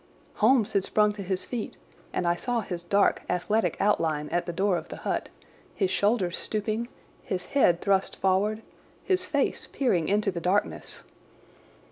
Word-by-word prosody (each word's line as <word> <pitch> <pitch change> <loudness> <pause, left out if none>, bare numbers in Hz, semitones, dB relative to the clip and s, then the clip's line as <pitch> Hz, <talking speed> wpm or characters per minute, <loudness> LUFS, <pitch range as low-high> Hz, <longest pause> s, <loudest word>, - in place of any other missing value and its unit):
Holmes 225 -1 +4
had 195 - +2
sprung 210 +1 +2
to 205 - -7
his 190 -1 -2
feet, 240 -4 -5 0.3
and 180 - -1
I 170 - +3
saw 240 +5 -1
his 175 -4 -5
dark, 200 +3 +2
athletic 210 +5 0
outline 155 -7 +1
at 175 0 -1
the - - -1
door 190 +2 +1
of 165 -1 -4
the - - -7
hut, - - -1 0.5
his 190 -3 0
shoulders 200 -2 +1
stooping, 215 +2 -2 0.3
his 180 -1 -3
head 175 -11 +3
thrust 195 -1 +1
forward, 205 +4 +1 0.4
his 370 -1 +1
face 285 -5 -1
peering 185 - +1
into 205 0 +2
the 170 -2 -5
darkness. 185 +4 -1
200 Hz, 160 wpm, -27 LUFS, 180-215 Hz, 0.5 s, Holmes